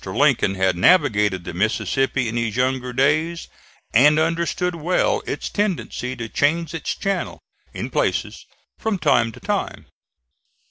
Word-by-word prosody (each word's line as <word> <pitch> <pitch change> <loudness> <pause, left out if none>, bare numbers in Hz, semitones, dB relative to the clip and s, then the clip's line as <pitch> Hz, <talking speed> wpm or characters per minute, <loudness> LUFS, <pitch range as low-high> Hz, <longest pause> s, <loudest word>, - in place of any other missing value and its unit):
Lincoln 95 - +2
had 95 -1 +1
navigated 105 - +3
the 85 - -7
Mississippi 120 +6 0
in 115 - -4
his 115 -3 -1
younger 125 0 0
days 155 +6 +1 0.5
and 145 +6 +6
understood 170 +2 0
well 170 +2 0
its - - -3
tendency 180 -10 -2
to 115 -2 -5
change 160 +6 0
its 165 - -3
channel, 195 -1 -2 0.3
in - - -6
places, - - -1 0.3
from 220 -3 -1
time 130 -8 +2
to - - -13
time. - - -3
135 Hz, 135 wpm, -21 LUFS, 115-165 Hz, 0.5 s, and